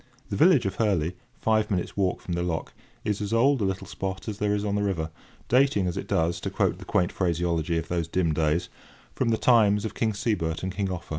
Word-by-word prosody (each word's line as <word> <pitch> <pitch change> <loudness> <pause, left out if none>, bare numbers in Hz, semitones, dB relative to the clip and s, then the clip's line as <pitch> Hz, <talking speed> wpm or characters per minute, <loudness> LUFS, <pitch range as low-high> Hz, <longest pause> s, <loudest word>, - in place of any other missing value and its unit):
The - - 0
village 160 - +5
of 95 - -2
Hurley, 90 -6 +1 0.2
five 110 -1 +2
minutes' 90 -4 -2
walk 95 -2 0
from 90 - -4
the 85 - -1
lock, 85 -2 -3 0.3
is 105 -1 -1
as 105 +1 -2
old 130 +2 +4
a - - +2
little 95 0 -2
spot 95 +2 -5
as 105 -1 -4
there 105 0 +1
is 105 0 -2
on 100 - -1
the 105 - +1
river, 85 -6 -1 0.4
dating, 125 -6 +3
as 90 - -1
it - - -4
does, 80 +1 0
to - - -2
quote - - 0
the - - -10
quaint 90 - +1
phraseology 85 -2 0
of 80 0 -3
those 85 -2 -1
dim 85 -2 +1
days, 80 +3 +1 0.5
"from 130 - 0
the 110 - +2
times 105 -4 +4
of 110 - -4
King 110 0 0
Sebert 100 -7 -1
and 95 0 -2
King 95 +1 -1
Offa." 90 -2 -5
95 Hz, 235 wpm, -26 LUFS, 85-105 Hz, 0.5 s, village